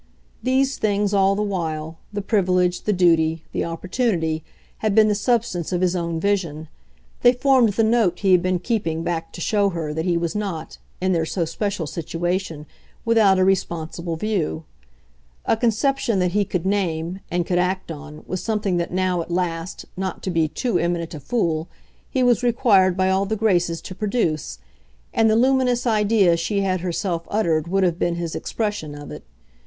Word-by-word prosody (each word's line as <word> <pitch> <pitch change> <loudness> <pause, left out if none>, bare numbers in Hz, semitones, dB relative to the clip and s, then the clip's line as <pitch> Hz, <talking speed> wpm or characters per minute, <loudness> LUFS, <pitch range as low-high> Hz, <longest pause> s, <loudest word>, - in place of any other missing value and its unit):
These 265 +1 +1
things, 205 -1 +1
all 195 0 +4
the 210 - 0
while, 160 -5 -3
the 205 -1 -4
privilege, 180 -4 +1
the 210 - +2
duty, 165 -4 +3
the - - -1
opportunity, 165 -2 -1 0.4
had 215 -2 0
been 220 -1 +6
the - - +3
substance 210 -6 0
of 180 -1 0
his 185 0 +2
own 170 -2 -2
vision; 165 -5 -1 0.5
they 245 - +6
formed 255 -4 +3
the 225 - +2
note 220 -6 +2
he 195 -2 +3
had 180 -1 +6
been 185 0 +1
keeping 165 -6 -2
back 165 -1 -3
to 175 - -8
show 205 +2 +2
her 165 -4 -4
that 160 +2 -2
he 175 -2 +2
was 170 -1 -2
not, 195 -6 -4 0.2
in 185 +1 +1
their 165 -2 +1
so 170 -1 -1
special 190 +1 -2
situation, 165 0 -3 0.4
without 220 -4 +4
a 185 - +3
responsible 170 -2 -1
view. 165 -4 -2 0.8
A - - +3
conception 235 +1 +1
that 180 -1 +1
he 205 +2 +1
could 180 -2 -3
name, 180 -3 -1
and 175 0 0
could 175 0 +1
act 185 0 -1
on, 150 0 -9
was 185 - -4
something 210 -5 -1
that 170 - -2
now, 185 -1 0
at 165 - -8
last, 170 0 -3
not 190 0 -4
to 190 - -2
be 165 -2 +2
too 230 - -1
eminent 170 -1 -1
a 155 - -6
fool, 160 - -1 0.4
he 260 - +1
was 245 -1 +3
required 215 -7 +3
by 190 0 +2
all 195 +1 +1
the 220 - -1
graces 175 -6 +1
to 185 - -8
produce, 185 - -1 0.6
and 225 0 +3
the 215 - +3
luminous 250 0 +2
idea 210 -5 +3
she 200 +5 -1
had 185 -2 0
herself 170 -1 -2
uttered 170 -7 0
would 195 +2 +1
have 175 -1 +1
been 175 - 0
his 170 -1 -4
expression 205 -9 -3
of 145 0 -9
it. - - -9
185 Hz, 185 wpm, -22 LUFS, 170-210 Hz, 0.8 s, been